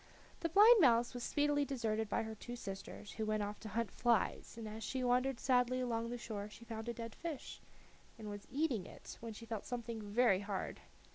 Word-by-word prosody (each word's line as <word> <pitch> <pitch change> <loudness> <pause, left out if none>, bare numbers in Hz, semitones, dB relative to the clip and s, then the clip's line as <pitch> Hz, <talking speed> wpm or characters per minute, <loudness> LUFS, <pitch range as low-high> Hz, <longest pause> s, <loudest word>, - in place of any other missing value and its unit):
The 335 - -1
blind 420 +5 +8
mouse 240 -4 +5
was 245 - -5
speedily 290 0 +2
deserted 225 -6 -1
by - - +1
her 220 0 -5
two 240 +3 -7
sisters, 200 -1 -7
who 220 - -3
went 215 -1 +1
off 205 0 -4
to 220 - -7
hunt 225 +2 -1
flies, 240 -2 +1
but 225 -1 -5
as 220 +1 -6
she 260 -1 -2
wandered 250 +1 +2
sadly 255 -1 +3
along 230 -2 -1
the 245 - -3
shore 210 -3 -5
she 210 +3 -12
found 225 0 -5
a - - -1
dead 230 -1 -6
fish, 325 -5 -6 0.6
and 220 -2 -7
was 205 -1 -7
eating 265 - 0
it, - - -10
when 230 -1 -6
she 230 +2 -9
felt 225 -3 -4
something 235 -2 -4
very 205 -1 +3
hard. 200 -1 -3
230 Hz, 210 wpm, -37 LUFS, 215-250 Hz, 0.6 s, blind